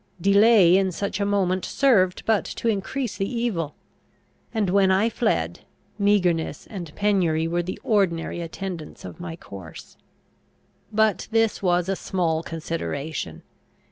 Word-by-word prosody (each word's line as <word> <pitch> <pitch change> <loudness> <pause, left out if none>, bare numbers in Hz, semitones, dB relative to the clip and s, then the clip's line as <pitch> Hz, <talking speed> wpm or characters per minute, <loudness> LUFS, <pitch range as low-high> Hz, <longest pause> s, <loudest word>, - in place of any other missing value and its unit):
Delay 200 -1 +6
in 190 -1 +1
such 200 +3 -3
a 200 - 0
moment 190 -2 +1
served 200 -10 +2
but 220 -2 +2
to - - -4
increase 225 +3 -2
the 195 - -1
evil; 220 - -2 0.8
and 220 -3 0
when 195 0 +4
I 195 +4 +3
fled, 225 0 0 0.4
meagreness 180 -7 +1
and 175 -7 -7
penury 175 -6 +1
were 175 +1 0
the 185 +2 -5
ordinary 180 -6 +1
attendants 170 -1 -6
of - - -9
my 175 -2 -6
course. 95 - -11 0.9
But 220 -3 +2
this 225 -1 +1
was 175 -2 +2
a 195 - 0
small 170 -5 -1
consideration. 155 - -4
190 Hz, 135 wpm, -24 LUFS, 165-205 Hz, 0.9 s, Delay